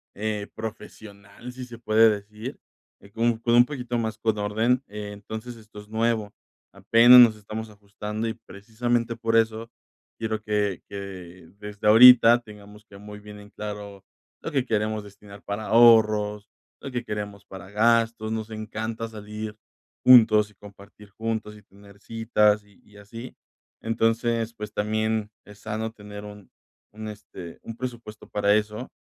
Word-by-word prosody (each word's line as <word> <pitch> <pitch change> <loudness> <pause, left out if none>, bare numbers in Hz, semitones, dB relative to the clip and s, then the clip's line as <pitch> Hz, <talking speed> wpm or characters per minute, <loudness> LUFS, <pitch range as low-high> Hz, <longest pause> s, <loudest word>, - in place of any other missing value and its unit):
eh, 105 -1 -3
profesional, 110 0 -9
si 130 - -8
se 120 -1 -11
puede 110 -1 +4
decir, 105 +4 -6 0.4
eh, 100 - -17
como 115 +1 0
con 120 0 +2
un 120 +1 +7
poquito 125 -4 -4
más 110 -2 -3
con 110 -1 -1
orden, 110 +5 0
eh, 105 0 -7
entonces 110 +4 -8
esto 110 -2 -14
es 105 - -13
nuevo, 110 -1 -1 0.4
apenas 120 +2 +7
nos 115 -2 +6
estamos 110 +2 -7
ajustando, 105 +1 -6
y 110 - -2
precisamente 115 +2 -3
por 115 0 -1
eso 115 0 +1 0.5
quiero 110 -1 -3
que 105 -3 -1
que 95 -3 -9
desde 105 0 -5
ahorita 120 +1 +9
tengamos 105 -2 -15
que 100 -2 -15
muy 105 0 -10
bien 105 0 -12
en 105 0 -14
claro 105 -2 -8 0.4
lo 165 - -5
que 135 -4 +1
queremos 110 -1 -1
destinar 100 0 -14
para 100 +1 -5
ahorros, 105 -2 +4 0.3
lo 135 - -7
que 125 -1 -3
queremos 105 -2 -6
para 95 0 -11
gastos, 115 0 +2
nos 110 0 -4
encanta 110 +1 -5
salir 105 0 -8 0.5
juntos 110 -4 +7
y - - -22
compartir 100 0 -16
juntos 110 0 -4
y 105 - -16
tener 100 0 -19
citas, 105 -2 +1
y 100 - -25
y 105 - -20
así, 115 +4 -10 0.5
entonces, 115 0 0
pues 105 -2 -8
también 110 0 -1
es 105 0 -15
sano 110 +1 -4
tener 105 -1 -10
un 105 -2 -12 0.5
un, 110 0 -7
este, 100 -5 -10
un 115 - -8
presupuesto 115 -3 -8
para 100 0 +2
eso, 105 +3 -1
110 Hz, 155 wpm, -25 LUFS, 105-115 Hz, 0.5 s, ahorita